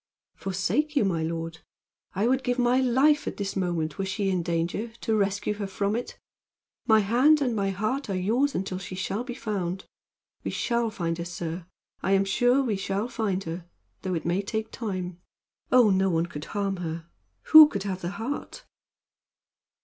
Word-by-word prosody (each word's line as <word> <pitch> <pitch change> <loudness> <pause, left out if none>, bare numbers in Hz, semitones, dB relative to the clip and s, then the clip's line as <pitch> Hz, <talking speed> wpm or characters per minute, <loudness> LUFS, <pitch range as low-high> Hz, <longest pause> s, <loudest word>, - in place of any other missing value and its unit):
"Forsake 240 +11 -1
you, 275 - +3
my 170 -4 0
lord; 165 0 -4 0.6
I 200 +4 +1
would 260 +2 +2
give 245 0 0
my 245 +1 +3
life 265 +4 +3
at - - -4
this 200 -1 -3
moment, 175 -4 -1
were 195 - 0
she 195 0 -1
in 180 -2 +1
danger, 170 +6 -1
to 220 - +1
rescue 205 0 0
her 205 -1 -4
from 200 +2 -1
it! 245 - -5 0.7
My 220 -1 +6
hand 255 +9 +4
and 250 -5 0
my 200 -2 0
heart 215 +7 -2
are 195 - -1
yours 240 +10 +1
until 185 0 -2
she 185 -1 -7
shall 195 +4 -2
be 245 -1 -6
found. 195 -6 -3 0.6
We - - -2
shall 235 -1 0
find 170 -5 -3
her, 170 - -3
sir. 175 0 -5 0.3
I 190 - +1
am 195 0 +3
sure 245 +7 +3
we 220 -6 0
shall 195 +4 -2
find 200 -6 -1
her 165 +1 -6 0.3
though 185 -2 -2
it 160 - -3
may 175 +3 +1
take 220 +2 -4
time. 185 -5 -4 0.5
Oh, 245 -5 +6
no 190 0 +3
one 165 -1 +1
could 150 -3 -7
harm 200 -2 -2
her! 165 -1 -5 0.5
Who 310 -1 +12
could 200 -9 -4
have 190 -2 -3
the 175 - -2
heart?" 230 +8 -5
195 Hz, 185 wpm, -27 LUFS, 180-235 Hz, 0.7 s, Who